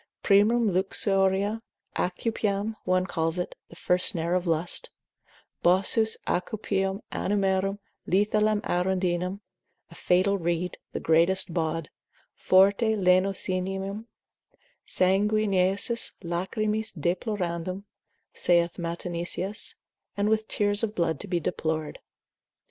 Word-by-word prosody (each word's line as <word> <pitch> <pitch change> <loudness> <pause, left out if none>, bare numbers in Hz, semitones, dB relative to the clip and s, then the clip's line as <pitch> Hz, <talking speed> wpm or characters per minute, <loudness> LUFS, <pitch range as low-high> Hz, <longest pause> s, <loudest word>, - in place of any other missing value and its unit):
Primum 215 +3 +4
luxuriae, 195 +2 +1 0.3
aucupium, 205 +2 -1
one 185 0 +2
calls 165 -1 -1
it, 180 - -3 0.2
the - - -13
first 180 +1 +2
snare 170 -4 +1
of 180 0 0
lust; 165 +1 0 0.7
Bossus 195 +5 +3
aucupium 195 +1 -1
animarum, 195 0 0 0.3
lethalem 210 +2 +2
arundinem, 180 +1 -1 0.5
a - - -11
fatal 185 +3 +2
reed, 175 +1 -2
the - - -4
greatest 170 +2 +2
bawd, 160 -2 -2 0.4
forte 200 +4 +4
lenocinium, 190 +2 0 0.8
sanguineis 200 +2 +2
lachrymis 210 +5 -2
deplorandum, 180 +1 -2 0.5
saith 170 0 +1
Matenesius, 175 +3 -3 0.4
and 205 +1 +1
with 220 0 +1
tears 205 0 +1
of 220 -2 -2
blood 160 -4 0
to 205 - -7
be 175 -2 0
deplored. 155 -1 -3
190 Hz, 100 wpm, -27 LUFS, 175-205 Hz, 0.8 s, Primum